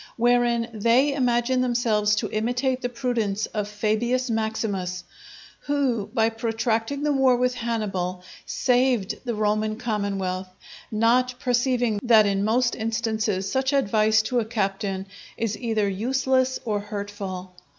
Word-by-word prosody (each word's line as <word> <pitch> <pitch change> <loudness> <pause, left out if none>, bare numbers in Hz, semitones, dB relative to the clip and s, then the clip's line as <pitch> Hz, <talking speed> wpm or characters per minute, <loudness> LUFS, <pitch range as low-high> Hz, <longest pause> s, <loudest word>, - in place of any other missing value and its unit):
Wherein 240 -1 +2
they 235 +6 +3
imagine 250 -1 +1
themselves 225 -4 +2
to 210 - -2
imitate 245 +4 0
the 245 - -2
prudence 230 -4 -1
of 210 -1 -3
Fabius 230 +4 0
Maximus, 205 -5 -2 0.6
who 265 -8 0
by 225 -2 +2
protracting 225 +4 -1
the 300 - +2
war 265 -2 +4
with 250 +1 +1
Hannibal, 195 -7 -3 0.2
saved 250 -5 +1
the 240 -2 -2
Roman 215 0 0
commonwealth; 200 -5 -2 0.4
not 240 +3 +2
perceiving 245 -3 +1
that 225 -3 +5
in 200 -1 +1
most 240 +3 +2
instances 220 -3 -1
such 265 +1 0
advice 220 -4 +3
to 245 +2 0
a 225 - -1
captain 195 -3 -2 0.3
is 225 -2 -1
either 220 -4 0
useless 260 +5 +1
or 210 -3 0
hurtful. 200 -3 -6
225 Hz, 130 wpm, -24 LUFS, 210-245 Hz, 0.6 s, that